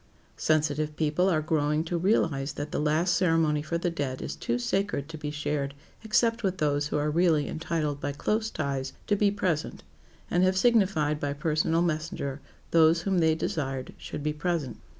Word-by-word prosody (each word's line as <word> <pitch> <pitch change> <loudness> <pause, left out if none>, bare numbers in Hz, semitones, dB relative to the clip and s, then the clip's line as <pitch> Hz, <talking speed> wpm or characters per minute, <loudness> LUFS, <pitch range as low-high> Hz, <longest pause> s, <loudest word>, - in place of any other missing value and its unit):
Sensitive 155 -1 +1
people 160 +4 +2
are 155 -4 +1
growing 150 -1 +1
to 170 +1 -3
realize 165 -7 +1
that 145 +1 -5
the - - -1
last 155 +4 +2
ceremony 165 -4 +2
for 160 +3 -2
the 175 +1 -1
dead 140 -5 -3
is - - -5
too 120 - -1
sacred 140 +4 -1
to 165 - -7
be 150 -1 -4
shared 145 -1 -2 0.3
except 230 +1 +2
with 190 -3 -1
those 145 -2 +1
who 150 - -1
are 150 +1 0
really 160 -3 +3
entitled 155 -3 -2
by 145 - -1
close 215 +10 -1
ties 135 -5 -3
to 205 - +2
be 205 0 +3
present 185 -6 -2 0.5
and 175 +1 +3
have 185 0 +3
signified 190 -10 +3
by 145 -1 -1
personal 160 +3 +1
messenger 155 -4 -2 0.3
those 165 0 +5
whom 190 -1 +1
they 160 -1 +3
desired 135 -5 -3
should 145 - -6
be 150 0 0
present. 150 -5 -2
155 Hz, 180 wpm, -28 LUFS, 145-175 Hz, 0.5 s, those